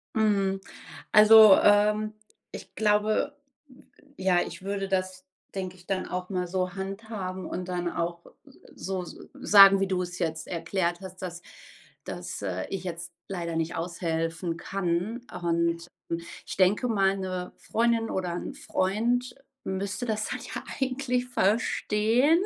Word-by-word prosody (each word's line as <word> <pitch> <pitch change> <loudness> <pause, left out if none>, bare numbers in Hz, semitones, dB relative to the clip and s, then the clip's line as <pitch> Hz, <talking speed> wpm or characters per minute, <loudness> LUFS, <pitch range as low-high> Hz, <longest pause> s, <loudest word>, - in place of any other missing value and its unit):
Mhm, 195 -3 +2 0.5
also, 215 -1 +9
ähm, 210 +1 +3 0.4
ich - - -10
glaube, 215 +6 +1 0.8
ja, 185 -2 +3
ich - - -6
würde 195 0 -2
das, 185 -1 -2 0.3
denke 185 -1 -4
ich, 180 - -20
dann 195 -1 -2
auch 180 0 -4
mal 180 -2 -2
so 185 +1 -2
handhaben 195 -2 -5
und 180 +1 -5
dann 175 -1 -2
auch 170 0 -3 0.5
so 190 -1 -3
s 175 - -10 0.2
sagen, 195 -1 +7
wie 195 - +1
du 185 -1 0
es 180 +1 -7
jetzt 160 -2 -2
erklärt 175 +1 -2
hast, 185 -1 -10
dass 175 -1 -6 0.6
dass, - - -6
äh, 95 -2 -3
ich 190 -2 -4
jetzt 170 -1 -6 0.2
leider 170 -3 -3
nicht 165 +2 -1
aushelfen 165 0 -2
kann. 190 +5 -2 0.2
Und 170 0 0 0.6
ich - - -6
denke 200 +6 +3
mal, 195 -3 +2
'ne 185 -1 -4
Freundin 230 0 +1
oder 180 -2 -2
'n - - -5
Freund 235 +6 0 0.3
müsste 195 +3 -3
das 215 -2 -2
halt - - -6
ja - - -4 0.2
eigentlich 255 -1 0
verstehen, 230 - +2
190 Hz, 140 wpm, -27 LUFS, 175-210 Hz, 0.8 s, also